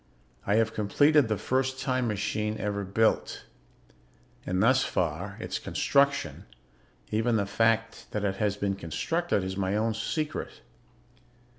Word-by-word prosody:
I 100 - +3
have 115 0 +2
completed 145 +7 +3
the 110 -2 0
first 130 +4 -1
time 130 -2 0
machine 105 0 -1
ever 100 -1 -2
built 110 +4 +1 1.0
and 90 +2 +1
thus 130 +3 +4
far, 90 +4 -2
its - - -4
construction, 140 0 +1 0.7
even 115 +2 +1
the 100 -2 +1
fact 115 +2 0
that 105 - -3
it 100 -1 -1
has 105 -1 0
been 100 -1 0
constructed, 100 - -1
is 95 0 -4
my 95 0 0
own 110 +1 +1
secret. 150 +7 -3
110 Hz, 135 wpm, -28 LUFS, 100-125 Hz, 1.0 s, thus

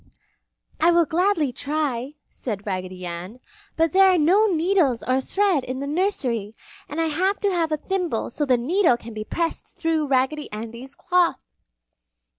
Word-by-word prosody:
"I 330 - +4
will 340 -1 +4
gladly 325 -4 +1
try," 285 -1 -2
said 205 -5 -6
Raggedy 185 -2 -4
Ann, 175 +7 -7 0.4
"but 325 -1 +2
there 385 0 +6
are 365 - +3
no 370 +8 +4
needles 335 - +2
or 255 +1 +1
thread 385 -2 +1
in 255 +1 -5
the 280 - -3
nursery, 265 - -1 0.3
and 300 - -4
I 330 - +2
have 365 +6 0
to 405 -1 +2
have 335 -3 0
a 305 - +1
thimble 350 - -2
so 295 - -2
the 260 -3 +3
needle 310 +2 +2
can 230 -1 -10
be 215 0 -5
pressed 335 +8 -3
through 320 -2 0
Raggedy 270 +3 0
Andy's 235 +5 -7
cloth!" 360 -1 +1
300 Hz, 165 wpm, -23 LUFS, 240-345 Hz, 0.4 s, there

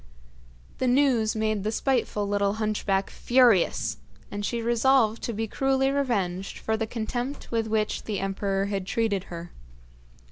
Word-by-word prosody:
The 260 - +1
news 245 -4 +3
made 215 -2 0
the 215 - -1
spiteful 230 -4 0
little 200 0 +1
hunchback 210 -3 -1
furious, 240 -7 +3 0.3
and 205 0 -4
she 235 +3 -1
resolved 235 0 +3
to - - -2
be 225 0 -2
cruelly 270 +4 +1
revenged 200 -10 -1
for 220 - -1
the 220 0 -2
contempt 240 +5 -4
with 225 -1 0
which 215 -1 -1
the 205 -3 -2
emperor 195 0 -1
had 195 -2 -3
treated 205 -4 0
her. 170 0 -8
220 Hz, 145 wpm, -26 LUFS, 200-240 Hz, 0.3 s, news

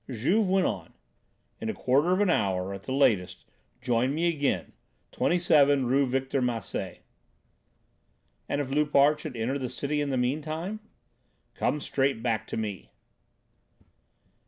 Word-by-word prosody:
Juve 175 - +1
went 190 0 +3
on: - - -3 0.7
"In 225 - -4
a 220 - -3
quarter 140 +7 +2
of 185 +2 +2
an 205 - +3
hour 95 - 0
at 100 - -7
the 110 - -7
latest 110 -9 +1 0.4
join 125 +2 +1
me 170 +2 +1
again, 145 -5 -1 0.4
27 145 -6 +3
Rue 135 +3 +2
Victor 135 +1 -1
Massé." 120 -4 -3 1.5
"And 145 - 0
if 135 -2 -3
Loupart 150 0 +3
should 150 -6 -7
enter 125 +5 -1
the 130 - -3
Cité 145 +4 -2
in 145 - -1
the 130 - 0
meantime?" 155 +10 -2 0.7
"Come 150 - -1
straight 135 -4 -1
back 110 -3 -1
to - - -5
me." 105 -4 -5
140 Hz, 140 wpm, -27 LUFS, 120-150 Hz, 1.5 s, went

